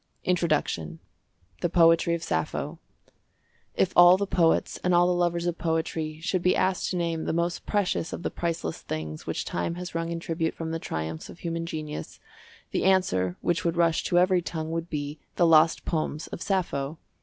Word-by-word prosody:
INTRODUCTION 150 Hz, -, 0 dB, 0.6 s
THE 175 Hz, -, +1 dB
POETRY 165 Hz, 0 st, +4 dB
OF 165 Hz, -, -6 dB
SAPPHO.—If 165 Hz, -, -5 dB
all 175 Hz, +1 st, +8 dB
the 200 Hz, -, -1 dB
poets 170 Hz, -4 st, +2 dB
and 180 Hz, -1 st, +3 dB
all 175 Hz, 0 st, +5 dB
the 180 Hz, -, +2 dB
lovers 175 Hz, -1 st, 0 dB
of 175 Hz, -1 st, -2 dB
poetry 160 Hz, -1 st, -2 dB
should 180 Hz, +2 st, 0 dB
be 180 Hz, +1 st, +3 dB
asked 185 Hz, 0 st, +1 dB
to 180 Hz, -, -2 dB
name 165 Hz, -2 st, -1 dB
the -, -, -1 dB
most 170 Hz, +1 st, -1 dB
precious 200 Hz, -5 st, 0 dB
of -, -, -6 dB
the -, -, -2 dB
priceless 170 Hz, -1 st, -3 dB
things 80 Hz, 0 st, -5 dB
which -, -, -2 dB
time 170 Hz, -, -2 dB
has 180 Hz, 0 st, -6 dB
wrung 165 Hz, 0 st, -2 dB
in 170 Hz, 0 st, -3 dB
tribute 165 Hz, 0 st, -2 dB
from 165 Hz, -1 st, -4 dB
the 165 Hz, -, -2 dB
triumphs 80 Hz, -, -5 dB
of -, -, -11 dB
human 165 Hz, -1 st, -3 dB
genius, 155 Hz, -2 st, -6 dB, 0.5 s
the -, -, 0 dB
answer 135 Hz, -, +2 dB
which 175 Hz, +1 st, 0 dB
would 170 Hz, -1 st, 0 dB
rush 165 Hz, -2 st, +3 dB
to 175 Hz, -, +2 dB
every 180 Hz, 0 st, +4 dB
tongue 160 Hz, -2 st, -4 dB
would 165 Hz, +1 st, -3 dB
be 145 Hz, 0 st, -4 dB, 0.2 s
"The 175 Hz, -, +4 dB
Lost 165 Hz, 0 st, +5 dB
Poems 155 Hz, -1 st, -2 dB
of -, -, -8 dB
Sappho." 165 Hz, -7 st, -1 dB
165 Hz, 185 wpm, -27 LUFS, 160-175 Hz, 0.6 s, all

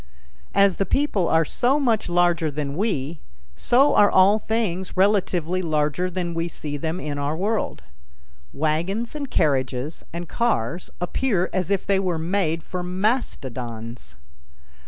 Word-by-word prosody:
As 200 Hz, -2 st, +4 dB
the 195 Hz, -, +1 dB
people 215 Hz, -, +1 dB
are 160 Hz, 0 st, +3 dB
so 265 Hz, -, +1 dB
much 230 Hz, -9 st, +1 dB
larger 175 Hz, -2 st, +2 dB
than 145 Hz, -1 st, -4 dB
we, 165 Hz, -6 st, -2 dB, 0.4 s
so 250 Hz, -, +4 dB
are 205 Hz, -, +6 dB
all 195 Hz, +3 st, +5 dB
things 195 Hz, -5 st, -2 dB
relatively 185 Hz, -3 st, +2 dB
larger 155 Hz, +2 st, 0 dB
than 175 Hz, -1 st, -3 dB
we 165 Hz, +1 st, -1 dB
see 150 Hz, -3 st, -5 dB
them 160 Hz, +4 st, -3 dB
in 145 Hz, -4 st, -4 dB
our 145 Hz, +2 st, -1 dB
world. 200 Hz, -, -1 dB, 0.7 s
Wagons 170 Hz, -, -1 dB
and 290 Hz, -3 st, -5 dB
carriages 135 Hz, -1 st, 0 dB
and 170 Hz, +1 st, -5 dB
cars 175 Hz, -, -1 dB
appear 185 Hz, +1 st, 0 dB
as 185 Hz, -1 st, -1 dB
if 200 Hz, -2 st, 0 dB
they 195 Hz, -1 st, +2 dB
were 180 Hz, -3 st, -1 dB
made 165 Hz, -1 st, -1 dB
for 180 Hz, -, -5 dB
mastodons. 125 Hz, -, -3 dB
175 Hz, 140 wpm, -23 LUFS, 150-200 Hz, 0.7 s, are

